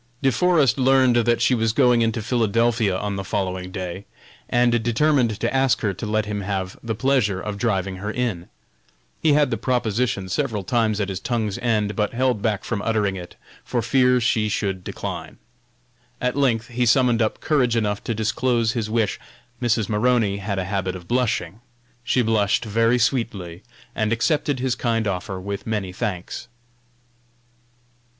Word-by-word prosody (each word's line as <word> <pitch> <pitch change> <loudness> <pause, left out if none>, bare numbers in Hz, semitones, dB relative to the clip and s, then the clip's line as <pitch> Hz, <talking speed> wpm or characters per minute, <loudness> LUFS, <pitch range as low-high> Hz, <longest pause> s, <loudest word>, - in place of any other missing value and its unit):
De 135 - +4
Forest 155 -7 +3
learned 130 -1 +4
that 120 0 +2
she 125 - +3
was 115 -2 +1
going 125 -2 +4
into 115 -1 0
Philadelphia 115 -3 +1
on 100 0 -3
the 95 - -3
following 95 -2 -3
day, 95 +1 -6 0.4
and 120 0 +3
determined 120 -2 +2
to - - -1
ask 135 -3 +2
her 100 -2 0
to 105 +4 -6
let 110 0 0
him 105 -1 -3
have 95 -1 -3
the 115 -1 -3
pleasure 120 -6 +1
of 105 +1 -4
driving 95 -5 -1
her 105 +3 -4
in. 110 -7 -3 0.7
He 155 -2 +4
had 145 -2 +3
the 115 - 0
proposition 115 -4 -1
several 110 0 -1
times 110 0 +1
at 100 -1 -1
his 95 -2 -3
tongue's 110 -2 -2
end, 105 -3 0
but 105 0 -1
held 125 -3 +1
back 105 -3 0
from 110 -4 -3
uttering 105 -3 0
it, 90 -2 -9 0.3
for 120 -2 -2
fear 125 +2 +3
she 110 -3 +1
should 95 -3 -2
decline. - - -6 0.8
At 125 0 -1
length 120 -5 +1
he 125 0 0
summoned 120 -1 +3
up 110 - 0
courage 125 -6 +1
enough 105 -3 -1
to 115 - -1
disclose 115 +1 +1
his 115 -3 -3
wish. 110 -2 0 0.4
Mrs. 115 -4 +1
Maroney 110 -2 +2
had 100 0 -3
a 95 - -1
habit 95 -1 -2
of 90 -2 -10
blushing. 115 -5 -1 0.4
She 125 +1 +2
blushed 110 -1 +1
very 115 +3 +2
sweetly, 110 -8 -1 0.3
and 110 -1 -1
accepted 145 +3 +1
his 130 -1 0
kind 115 -3 -1
offer 95 0 -3
with 100 +3 -5
many 105 -4 -2
thanks. 95 -3 -4
110 Hz, 170 wpm, -22 LUFS, 100-125 Hz, 0.8 s, De